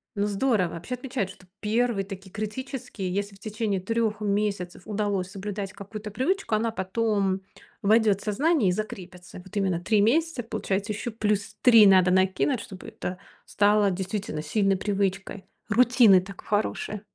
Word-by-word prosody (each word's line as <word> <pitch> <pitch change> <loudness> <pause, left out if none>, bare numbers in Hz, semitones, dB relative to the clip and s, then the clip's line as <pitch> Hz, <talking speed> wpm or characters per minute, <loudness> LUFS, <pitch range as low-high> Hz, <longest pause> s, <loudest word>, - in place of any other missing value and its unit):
Ну, 200 0 0
здорово. 205 -4 +1
Вообще 175 +10 -5
отмечают, 250 -6 -3
что 185 - -14 0.2
первый 220 -1 +1
такие 195 -1 -9
критический. 215 -2 -5
Если 200 +1 -3
в - - -20
течение 215 -2 -2
3 220 +2 -1
месяцев 200 -4 -1
удалось 200 -3 -1
соблюдать 200 -1 -5
какую-то 210 +2 -8
привычку, 315 - -1
она 225 +1 0
потом 195 -1 0 0.4
войдёт 210 -1 +4
в - - -11
сознание 255 - +2
и - - +3
закрепится. 185 -4 -7
Вот 190 +2 -14
именно 190 -4 +1
3 205 +3 +2
месяца, 295 +3 +2
получается, 205 -2 -2
ещё 215 +3 -4
плюс 210 -2 -1
3 230 -4 +8
надо 185 -2 +6
накинуть, 190 +7 +2
чтобы 190 -2 -10
это 180 0 -6 0.3
стало 205 0 +3
действительно 190 -3 -3
сильной 195 +5 +1
привычкой, 195 -1 -2 0.2
рутины, 240 -3 +6
так, 195 +1 -9
хорошее. 210 0 -2
205 Hz, 150 wpm, -26 LUFS, 190-220 Hz, 0.4 s, 3